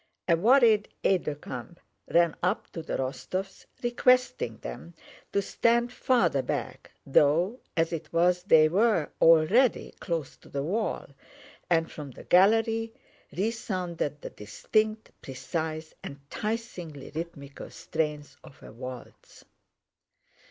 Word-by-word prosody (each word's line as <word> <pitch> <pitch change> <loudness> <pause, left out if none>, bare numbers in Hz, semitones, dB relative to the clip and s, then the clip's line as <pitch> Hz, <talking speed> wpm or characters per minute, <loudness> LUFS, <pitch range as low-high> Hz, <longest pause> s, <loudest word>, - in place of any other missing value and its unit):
A 170 - +5
worried 220 +2 +4
aide 190 -3 +2
de 150 - -2
camp 145 +4 -9 0.3
ran 170 -1 +3
up 185 +4 -1
to 165 - -6
the 160 - -3
Rostóvs 185 +8 -4 0.2
requesting 250 +1 +2
them 170 0 -9 0.4
to 200 - +1
stand 235 +4 +1
farther 180 - +2
back, 125 - -4 0.2
though 160 - +3 0.2
as 165 +1 +1
it 165 - -5
was 175 +1 +3
they 160 -4 +6
were 195 -1 +2
already 165 +11 +4
close 165 -6 -3
to - - -18
the 140 0 -3
wall, 210 +9 -2 0.6
and 165 -2 +2
from 150 -2 -8
the 125 - -12
gallery 225 +4 +3 0.4
resounded 180 - -3
the - - -6
distinct, 215 - -1
precise, 155 +4 -5
enticingly 165 - -6
rhythmical 150 -4 -7
strains 150 -2 -4
of 135 - -16
a - - -11
waltz. 125 +1 -10
170 Hz, 120 wpm, -28 LUFS, 150-215 Hz, 0.6 s, they